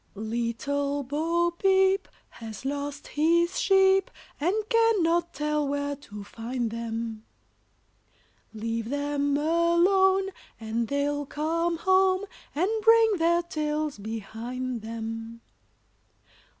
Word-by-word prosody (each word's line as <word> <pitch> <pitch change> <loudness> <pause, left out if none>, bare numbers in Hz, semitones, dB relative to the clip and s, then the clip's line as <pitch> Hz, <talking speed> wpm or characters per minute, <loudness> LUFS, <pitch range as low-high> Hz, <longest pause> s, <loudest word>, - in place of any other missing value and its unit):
] - - -38
Little 240 +6 -2
Bo 330 +5 0
Peep 385 +2 +3 0.2
has 225 +1 -9
lost 285 +1 -4
his 340 +3 +2
sheep, 385 -1 +4 0.3
And 350 +7 +1
cannot 375 -8 +2
tell 300 -1 -1
where 285 0 -2
to 210 -8 -10
find 230 +2 -4
them 225 -1 -4 1.3
Leave 225 +1 -3
them 285 0 0
alone, 345 +5 +3 0.3
and 225 +1 -2
they'll 285 +1 -1
come 335 +4 -1
home, 375 +2 +3 0.3
And 360 +8 +1
bring 450 -1 +5
their 340 +1 +2
tails 305 -5 -2
behind 225 +4 -5
them. 225 +1 -6
290 Hz, 100 wpm, -27 LUFS, 230-345 Hz, 1.3 s, bring